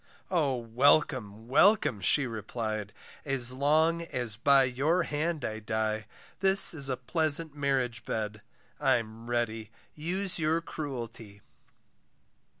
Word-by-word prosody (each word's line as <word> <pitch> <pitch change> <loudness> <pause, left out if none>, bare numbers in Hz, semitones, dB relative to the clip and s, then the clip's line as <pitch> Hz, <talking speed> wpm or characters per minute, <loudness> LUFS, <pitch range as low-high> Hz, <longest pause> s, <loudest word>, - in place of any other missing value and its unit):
O 150 -7 0
welcome, 115 -2 0
welcome, 140 - +2
she 135 +9 +3
replied, 110 -2 -5 0.3
As 130 -3 +4
long 155 +5 +1
as 125 -9 -3
by 135 +4 +3
your 140 +8 0
hand 155 +1 -3
I 110 0 -5
die, 110 0 -3 0.3
This 195 -1 +8
is 140 -4 -2
a 130 - -2
pleasant 155 +3 -1
marriage 135 -5 -2
bed, 105 -1 -5 0.4
I'm 115 0 -2
ready, 115 -2 -3 0.2
use 180 +5 0
your 160 +1 0
cruelty. 120 -10 -8
130 Hz, 115 wpm, -28 LUFS, 110-155 Hz, 0.4 s, This